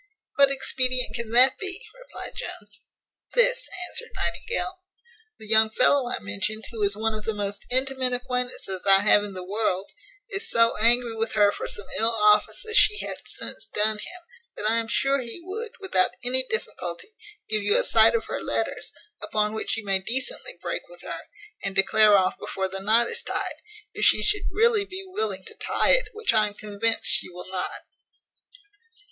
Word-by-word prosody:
"What 280 -1 +5
expedient 255 -2 +1
can 235 -2 -5
that 255 +2 +6
be?" 380 -1 -2
replied - - -10
Jones. - - -8 0.5
"This," - - +2 0.2
answered 475 - -2
Nightingale. 370 -5 -3 0.6
"The 220 - -11
young 220 0 +4
fellow 250 +3 +3
I - - -2
mentioned, 100 - -4
who 225 -2 -6
is 200 0 +5
one 220 +1 -1
of 215 0 -6
the 220 - -3
most 205 0 -4
intimate 260 0 +1
acquaintances 250 -6 -3
I 195 0 +6
have 205 0 +4
in 200 -2 -7
the 185 - -5
world, 195 -1 -2 0.4
is 400 +3 -2
so 230 0 +3
angry 235 +1 +3
with 225 +1 -3
her 205 -1 +4
for - - -6
some 205 - -7
ill 225 +1 +3
offices 210 - +2
she 420 - +5
hath - - -7
since - - -7
done 215 0 +1
him, 355 +9 -9 0.3
that 210 - -2
I 225 +1 +2
am 230 -1 -2
sure 275 +4 +1
he 235 +5 -7
would, 430 +5 -6
without 305 - +1
any 255 +1 +3
difficulty, 455 -2 -3 0.4
give 215 -1 0
you 430 - +4
a - - +1
sight - - +5
of 460 - -1
her - - -5
letters; - - -3 0.3
upon 210 0 -1
which 220 - -2
you 225 - -7
may 195 -1 +2
decently 265 - -2
break - - -4
with - - -14
her; - - -6 0.4
and 195 0 -4
declare 210 +2 +5
off 185 -1 0
before 190 0 -3
the 190 +1 -6
knot 220 +4 +3
is 470 0 -4
tyed, - - -2 0.4
if - - -4
she - - +5
should 420 -1 +1
really 445 -1 +2
be 385 -1 -7
willing 425 +4 -3
to 450 - -9
tie - - +1
it, - - +3
which 440 - 0
I 215 -1 +3
am 205 - -10
convinced 215 +2 -2
she - - +3
will 180 0 -10
not." 185 -1 -4
230 Hz, 185 wpm, -25 LUFS, -, 0.6 s, that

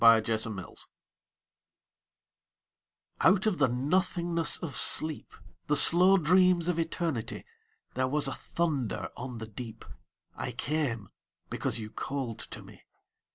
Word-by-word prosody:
The 115 -1 +7
Call 110 -3 -3 2.6
Out 190 - -4
of 210 -5 0
the - - +4
nothingness 170 +5 0
of 155 -7 -6
sleep, 155 -1 +2 0.4
The 150 - +1
slow 180 +6 +8
dreams 180 0 +3
of 175 -2 -1
Eternity, 165 -7 -4 0.5
There 130 0 -1
was 145 +1 0
a 135 - -3
thunder 150 -10 -3
on 125 -1 -7
the 110 - -7
deep: 115 +1 -10 0.5
I - - -6
came, 125 -8 -3 0.4
because - - -2
you 110 -1 -8
called 130 -6 -5
to - - -9
me. - - -16
145 Hz, 120 wpm, -28 LUFS, 115-170 Hz, 2.6 s, slow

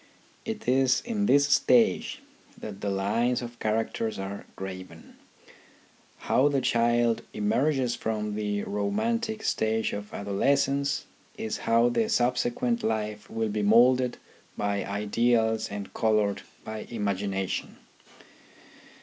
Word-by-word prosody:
It 225 - -5
is 130 0 +3
in 210 -4 -1
this 140 0 +5
stage 230 - +3 0.3
that 100 -2 -8
the 100 - -1
lines 115 +6 0
of 120 0 -9
character 110 +1 -1
are 95 +1 -6
graven. 95 -3 -8 1.1
How 135 - +4
the 140 -2 +2
child 120 -1 +2
emerges 125 +4 +1
from 105 -2 -3
the 105 -1 -2
romantic 220 - -1
stage 110 0 0
of 105 0 -6
adolescence 140 +7 0 0.3
is 110 - -3
how 115 +1 +5
the 220 - 0
subsequent 130 - +1
life 105 -1 -2
will 110 -1 -1
be 105 0 -1
moulded 125 +4 +4 0.4
by 100 -1 -1
ideals 110 +2 +1
and 100 -1 -6
coloured 105 -2 +1 0.2
by 110 0 -6
imagination. 100 -3 -2
110 Hz, 115 wpm, -27 LUFS, 105-130 Hz, 1.1 s, this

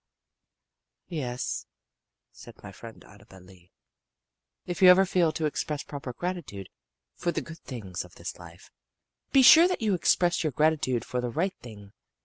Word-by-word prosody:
"Yes," 130 -7 -4 0.6
said - - -14
my - - -9
friend 115 -1 -13
Annabel 100 -2 -17
Lee, 90 -1 -19 0.9
"if 175 0 -5
you 185 - +9
ever 190 +2 +7
feel 180 -3 +1
to 160 - -2
express 150 0 -3
proper 140 -3 -7
gratitude 145 - -6 0.4
for 175 - -2
the - - -2
good 165 0 -11
things 100 -9 -7
of 90 0 -17
this 85 +1 -8
life, 85 0 -15 0.6
be 270 - +5
sure 325 +7 +9
that 365 -10 -3
you 210 -2 +1
express 175 0 +1
your 155 -3 -2
gratitude 145 -5 +1
for 125 - -3
the 125 - -3
right 180 +10 -1
thing. 105 -4 -13
140 Hz, 155 wpm, -27 LUFS, -, 0.9 s, you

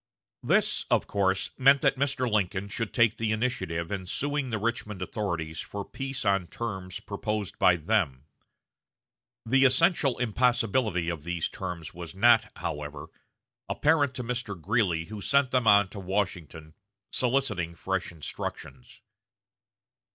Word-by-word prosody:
This, - - +2
of - - +2
course, 95 -2 0
meant 135 +1 +6
that 135 -1 +3
Mr. 135 -1 0
Lincoln 100 -2 0
should 115 +2 -3
take 115 -2 +3
the 110 -1 -1
initiative 110 -8 -2
in 95 -2 -4
suing 145 +5 -1
the 110 - -1
Richmond 105 -2 -3
authorities 85 -4 -3
for 100 -1 -5
peace 135 -1 -5
on 100 -3 +2
terms 95 -3 -5
proposed 105 -1 -4
by 90 - +6
them. 80 -6 0 1.2
The 135 +4 +4
essential 135 0 +4
impossibility 115 -5 +1
of 85 -4 -4
these 85 0 -2
terms 85 -2 -6
was 85 +1 -8
not, 115 +1 +5
however, 75 0 -5 0.6
apparent 145 -4 +2
to 125 - -3
Mr. 115 -5 -4
Greeley, 90 -3 +1
who 105 +3 -8
sent 140 +2 +2
them 125 -3 +2
on 100 -1 +6
to 100 - -8
Washington, 90 -5 -3 0.4
soliciting 115 -10 0
fresh 95 +1 -2
instructions. 120 - -7
105 Hz, 135 wpm, -28 LUFS, 90-125 Hz, 1.2 s, meant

